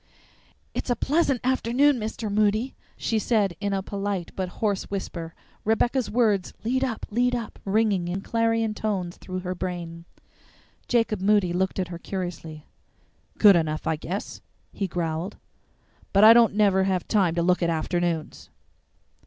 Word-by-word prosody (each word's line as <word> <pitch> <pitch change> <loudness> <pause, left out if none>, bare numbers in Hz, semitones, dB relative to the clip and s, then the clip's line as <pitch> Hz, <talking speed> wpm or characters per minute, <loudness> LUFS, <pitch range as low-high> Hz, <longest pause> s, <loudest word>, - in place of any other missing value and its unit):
"It's - - -4
a 245 - +2
pleasant 275 0 +1
afternoon, 260 +2 +2
Mr. 215 0 -4
Moody," 215 +4 +1 0.2
she 225 - 0
said 205 -5 +1
in 200 0 -2
a 195 -1 -1
polite 195 -3 -3
but 185 -1 -2
hoarse 205 +1 -2
whisper, 170 -4 -5 0.3
Rebecca's 235 +3 +1
words, 210 -5 +1
"LEAD 260 +4 0
UP! 240 -5 -2
LEAD 245 +3 +2
UP!" 235 -3 -6
ringing 200 -3 +1
in 180 +2 -3
clarion 225 0 0
tones 195 -5 -3
through 185 0 -6
her 180 0 -3
brain. 175 -2 -5 0.8
Jacob 225 -5 +1
Moody 200 -3 +3
looked 190 +1 -1
at 185 -2 -2
her 170 -1 -7
curiously. 170 -5 -6 0.7
"Good 205 -3 +7
enough, 155 -2 -1
I 160 - +1
guess," 180 +6 -5 0.3
he 195 - -2
growled; 170 +2 -3 0.8
"but 200 +1 +5
I 220 +1 +10
don't 230 -3 +5
never 195 -3 +3
have 185 -2 -1
time 190 -6 +2
to 170 - +1
look 180 +1 +2
at 170 - +2
afternoons." 165 0 -2
200 Hz, 155 wpm, -25 LUFS, 175-225 Hz, 0.8 s, I